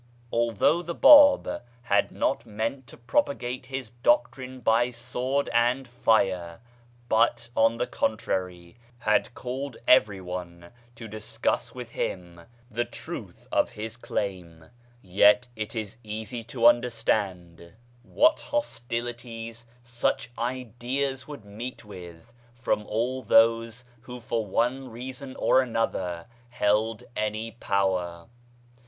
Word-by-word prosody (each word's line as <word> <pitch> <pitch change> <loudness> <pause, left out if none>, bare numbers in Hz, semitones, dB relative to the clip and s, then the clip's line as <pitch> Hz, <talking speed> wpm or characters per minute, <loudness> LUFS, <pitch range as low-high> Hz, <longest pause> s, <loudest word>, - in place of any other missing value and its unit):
Although 115 - +2
the 170 -1 -5
Bab 290 -1 +7 0.2
had 120 - +2
not - - 0
meant 115 +5 -4
to - - -13
propagate 125 - -1
his 130 -4 -5
doctrine 125 +2 +1
by 115 +1 +3
sword 125 +3 -2
and 120 +3 +2
fire, 95 -8 +1 0.5
but, 115 0 +2
on 115 +1 +3
the 125 - 0
contrary, 90 -6 -3 0.2
had 110 +1 +1
called 130 0 -5
everyone 90 -6 +1 0.2
to 115 -1 -9
discuss 110 +3 -2
with 125 -2 -8
him 90 -5 -4 0.3
the 120 +2 0
truth - - -8
of - - +2
his 110 +1 -6
claim, 90 -8 -5 0.3
yet 105 +6 +5
it 110 +1 -5
is 110 -2 -5
easy 110 +2 -5
to 120 0 -2
understand 105 -8 +1 0.3
what 310 - +3
hostilities 115 - -4
BABISM 120 0 -16
39 - - +3
such - - -10
ideas 130 +2 -2
would 145 -8 -9
meet 110 +4 -7
with 90 +2 -11 0.2
from 115 -3 -1
all 125 +4 -1
those 115 +1 +3
who 125 +1 -9
for 115 -2 -2
one 125 +6 0
reason 130 +3 -7
or 130 - +4
another 95 -8 -2 0.2
held 110 0 +1
any 110 +1 -2
power. 95 -6 -1
115 Hz, 120 wpm, -27 LUFS, 105-125 Hz, 0.5 s, Bab